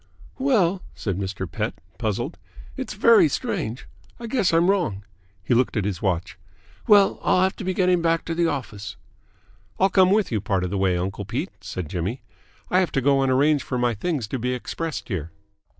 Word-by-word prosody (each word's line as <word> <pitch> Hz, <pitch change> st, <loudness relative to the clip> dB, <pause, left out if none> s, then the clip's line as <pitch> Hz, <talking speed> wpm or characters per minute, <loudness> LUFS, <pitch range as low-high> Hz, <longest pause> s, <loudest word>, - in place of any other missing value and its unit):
"Well," 200 Hz, -9 st, +2 dB
said 100 Hz, -3 st, -3 dB
Mr. 95 Hz, -1 st, -3 dB
Pett, 80 Hz, -, -3 dB, 0.2 s
puzzled. 120 Hz, -, -2 dB, 0.4 s
"It's -, -, -5 dB
very 405 Hz, -9 st, +6 dB
strange. 160 Hz, -, -3 dB, 0.3 s
I 235 Hz, -, -7 dB
guess 230 Hz, -5 st, +1 dB
I'm 165 Hz, +1 st, +3 dB
wrong." 170 Hz, -, 0 dB, 0.4 s
He 120 Hz, -, +1 dB
looked 120 Hz, 0 st, +2 dB
at 105 Hz, -, 0 dB
his 100 Hz, -4 st, -3 dB
watch. 90 Hz, -2 st, -2 dB, 0.5 s
"Well, 205 Hz, -2 st, +5 dB
I'll 185 Hz, -, +3 dB
have 190 Hz, -, +1 dB
to -, -, -6 dB
be 185 Hz, 0 st, -2 dB
getting 180 Hz, -2 st, +3 dB
back 165 Hz, 0 st, +1 dB
to 165 Hz, -, -2 dB
the 170 Hz, 0 st, +2 dB
office." 105 Hz, -8 st, -4 dB, 0.8 s
"I'll 195 Hz, -, +4 dB
come 190 Hz, -1 st, +5 dB
with 205 Hz, -3 st, +2 dB
you 110 Hz, -3 st, 0 dB
part 95 Hz, -2 st, 0 dB
of 90 Hz, -, -3 dB
the 100 Hz, -, -1 dB
way, 95 Hz, -2 st, +2 dB
uncle 95 Hz, +3 st, -3 dB
Pete," -, -, -3 dB
said 90 Hz, -4 st, -5 dB
Jimmy. 95 Hz, -, -3 dB, 0.5 s
"I 185 Hz, -, +4 dB
have 185 Hz, -, +1 dB
to 135 Hz, -, +2 dB
go 135 Hz, +1 st, +3 dB
and 135 Hz, -1 st, +2 dB
arrange 145 Hz, +2 st, +3 dB
for 125 Hz, -, -3 dB
my 120 Hz, -1 st, +1 dB
things 140 Hz, -, -2 dB
to 130 Hz, -, -3 dB
be 125 Hz, +2 st, -1 dB
expressed 160 Hz, +5 st, -5 dB
here." 85 Hz, -, -3 dB
135 Hz, 200 wpm, -24 LUFS, -, 0.8 s, very